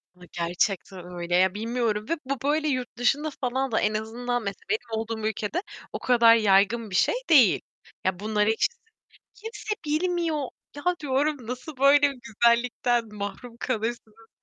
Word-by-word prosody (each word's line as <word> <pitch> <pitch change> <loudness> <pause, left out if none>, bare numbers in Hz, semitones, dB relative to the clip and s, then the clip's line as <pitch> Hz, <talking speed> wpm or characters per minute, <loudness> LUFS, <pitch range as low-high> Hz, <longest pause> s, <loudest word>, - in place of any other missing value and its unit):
Ya 180 - -17
gerçekten 180 +1 -2
öyle 175 -1 -3
ya, 185 +1 +4
bilmiyorum 225 -1 -1
ve 335 - +1
bu 275 +1 -2
böyle 305 +2 +1
yurt 255 -5 -2
dışında 285 +5 +1
falan 260 +1 -1
da 220 - +2
en 210 +1 +1
azından, 240 +2 -2
mesela 200 -2 -5
benim 220 +1 -2
olduğum 220 -1 -3
ülkede 220 - -2 0.3
o - - -3
kadar 235 -2 +6
yaygın 210 +1 +3
bir 185 - -5
şey 195 - +3
değil. 260 - +6 0.4
Ya, 185 -1 0
bunları 210 0 +1
hiç 220 - +2 0.7
kimse 430 0 -5
bilmiyor. 315 -2 0 0.3
Ya, 290 - -7 0.2
diyorum 285 -2 0
"Nasıl 255 +5 -6
böyle 280 +2 +6 0.2
güzellikten 235 +1 +1
mahrum 210 +4 -6
kalırsınız?" 225 -2 -4
235 Hz, 150 wpm, -26 LUFS, 210-270 Hz, 0.7 s, kadar